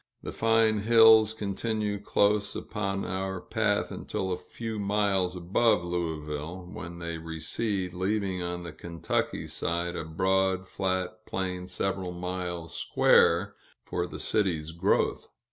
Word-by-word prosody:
The - - -4
fine 115 -1 +3
hills 110 0 +6
continue 105 0 -2
close 100 0 +2
upon 100 -2 -3
our 95 0 -3
path - - 0
until 95 -1 -3
a 90 - 0
few 110 +4 -6
miles 100 -3 +1
above 90 +3 +2
Louisville, 85 0 -4
when 85 0 -7
they 85 -1 -5
recede, 90 +4 -2
leaving 95 0 -1
on 90 0 -3
the 85 -2 -7
Kentucky 85 0 -2
side 85 +1 -2
a 85 - -3
broad, 95 +3 +1
flat 95 +3 -2
plain 90 -1 -3
several 95 0 -2
miles 90 -1 -4
square, - - +4 0.3
for 90 0 -2
the - - -8
city's 85 -7 0
growth. 85 +1 +1
95 Hz, 130 wpm, -28 LUFS, 85-105 Hz, 0.3 s, hills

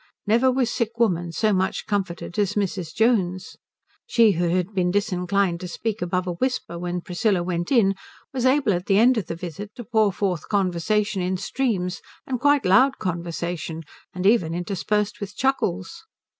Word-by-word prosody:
Never 235 +5 +4
was 250 -2 +1
sick 230 -1 -2
woman 175 -7 +1
so 215 +5 +1
much 190 0 0
comforted 190 -3 -3
as 205 -1 +1
Mrs. 185 -5 -2
Jones. 195 -6 +1 0.5
She 230 - +5
who 175 -1 0
had 180 +3 0
been 180 -2 +1
disinclined 185 -2 0
to 180 - -6
speak 220 +4 -4
above 180 +1 -1
a 180 - -2
whisper 210 -5 -2
when 175 0 -3
Priscilla 180 +1 0
went 175 +2 -3
in 215 -7 +4 0.4
was 255 -2 -2
able 260 -4 +3
at 175 +1 -3
the 195 - +4
end 240 +2 +5
of 185 - -6
the - - -4
visit 180 +4 -7
to 240 - -7
pour 215 -1 +2
forth 185 -4 -2
conversation 200 +1 0
in 185 +1 -1
streams, 185 -6 -2 0.2
and 255 -2 -3
quite 285 0 +3
loud 255 +9 +5
conversation, 170 -2 -4 0.3
and 180 +1 -5
even 195 -6 +3
interspersed 210 +5 -1
with 205 0 -6
chuckles. 205 - -1
195 Hz, 170 wpm, -24 LUFS, 175-220 Hz, 0.5 s, She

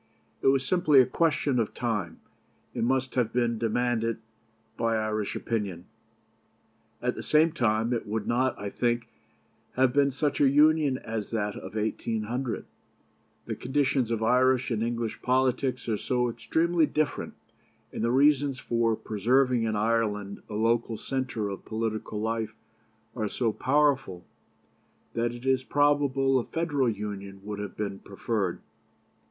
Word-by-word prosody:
It - - +1
was 135 0 +3
simply 155 -4 +4
a 130 - +7
question 145 -1 +1
of 110 - -2
time, 105 -8 -2 0.5
and 115 - 0
must 130 0 0
have 120 -3 +1
been 120 -2 0
demanded 115 0 0 0.6
by 115 -1 0
Irish 110 -1 -2
opinion. 100 -6 -3 1.2
At - - +1
the - - -7
same 155 +2 +3
time, 115 -5 +1
it 115 - -3
would 105 0 -2
not, 130 +2 +1
I 100 0 -5
think, 120 -1 -1 0.6
have 130 -1 +3
been 140 0 +4
such 145 +2 -1
a 140 - +6
Union 150 -1 +4
as 110 -4 -5
that 105 -3 -2
of - - -8
1800. 115 +3 -2 0.8
The - - -3
conditions 130 -2 0
of 115 -1 -1
Irish 125 +2 +3
and 110 -2 0
English 115 -1 -2
politics 130 0 +1
are 110 -2 0
so 125 -1 0
extremely 165 +6 +1
different, 155 +1 -2 0.6
and - - -3
the 115 - +2
reasons 140 +1 +3
for 115 -2 +1
preserving 120 +3 +1
in 110 -1 -1
Ireland 105 -2 0
a 105 - -5
local 115 +1 +1
centre 130 -5 -3
of 100 - -6
political 110 -1 -3
life 110 0 -2 0.6
are 105 -1 -2
so 115 -1 0
powerful, 135 -10 +1 0.9
that 115 0 0
it 120 +1 -9
is 130 -1 +3
probable 140 -2 +2
a - - -2
Federal 145 -6 0
Union 100 -2 -6
would 105 0 -5
have 105 -1 -6
been 100 -2 -3
preferred. 100 -2 -3
120 Hz, 145 wpm, -27 LUFS, 110-130 Hz, 1.2 s, a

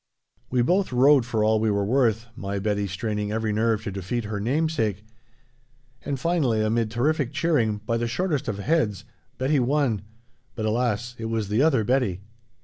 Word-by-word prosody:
We 125 -1 +2
both 185 +6 +1
rode 130 0 +5
for 110 -4 0
all 110 0 +3
we 110 0 +1
were 100 -1 +1
worth, 115 -1 +2
my 100 -3 -4
Betty 100 0 -1
straining 105 +2 -3
every 110 -1 -1
nerve 110 0 +1
to 105 - -4
defeat 100 +5 -3
her 105 -1 -4
namesake, 115 - -1 1.0
and 140 -2 -3
finally, 130 -9 +1
amid 110 +1 +1
terrific 135 +3 0
cheering, 145 -9 +1
by 115 +1 0
the 120 0 -1
shortest 155 +2 -1
of 100 - -2
heads, 105 - 0 0.3
Betty 135 +3 +1
won 130 -5 +1 0.5
but, 110 - -3
alas, 120 +1 -1
it 115 - -4
was 110 -3 -2
the 105 +4 +2
other 140 -7 +3
Betty! 115 -6 0
115 Hz, 170 wpm, -25 LUFS, 105-135 Hz, 1.0 s, rode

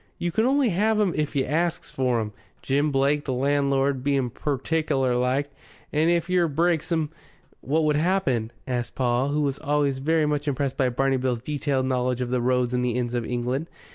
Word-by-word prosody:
You 175 - -2
can 220 +7 +2
only 275 -2 +3
have 215 +4 +2
'em 200 -5 +2
if 150 -1 -2
you 135 -2 +2
asks 165 +4 -1
for 125 -3 +1
'em, 110 -1 -3 0.3
Jim 145 +2 +1
Blake, 140 +2 +1
the 130 - -1
landlord, 140 0 +1
being 135 -3 +1
pertickler 140 -1 0
like. 130 +4 0 0.4
And 155 +2 +3
if 170 0 +1
yer 180 -2 +2
breaks 165 +2 0
em 160 -2 0 0.2
" - - -34
"What 155 +4 +1
would 150 -1 +2
happen?" 150 - +1
asked 125 -2 -3
Paul, 125 +1 +1
who 145 +1 0
was 140 -1 -1
always 145 -2 0
very 155 +3 +2
much 150 0 -1
impressed 140 -1 -1
by 130 -2 +2
Barney 135 +2 +1
Bill's 125 -2 -1
detailed 140 -2 -1
knowledge 125 -1 0
of 125 -1 -2
the 125 -1 +1
roads 125 0 +1
and 125 0 +1
the 120 -1 0
inns 120 -1 -2
of 120 -2 -2
England. 125 +5 -2
140 Hz, 200 wpm, -25 LUFS, 125-155 Hz, 0.4 s, only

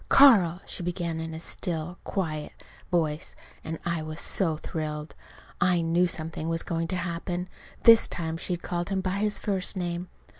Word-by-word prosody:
"Carl," 200 -11 +7
she - - -4
began 170 -2 -2
in 160 0 -4
a - - -5
still, 170 0 -3
quiet 155 -6 -2 0.4
voice, 160 -4 0 0.3
and 160 +1 -4
I 170 -2 0
was 155 +1 -5
so 165 -6 0
thrilled. 150 -1 -4 0.5
I 175 -1 +4
knew 170 +2 +3
something 160 -1 -4
was 165 0 0
going 165 0 -1
to 185 - -2
happen 175 0 -3 0.4
this 230 -1 +8
time 160 -2 -3
she'd 175 0 -3
called 175 0 -2
him 195 -1 0
by 190 +1 -1
his 210 0 +2
first 195 -1 -1
name. 175 0 -2
170 Hz, 165 wpm, -28 LUFS, 160-180 Hz, 0.5 s, this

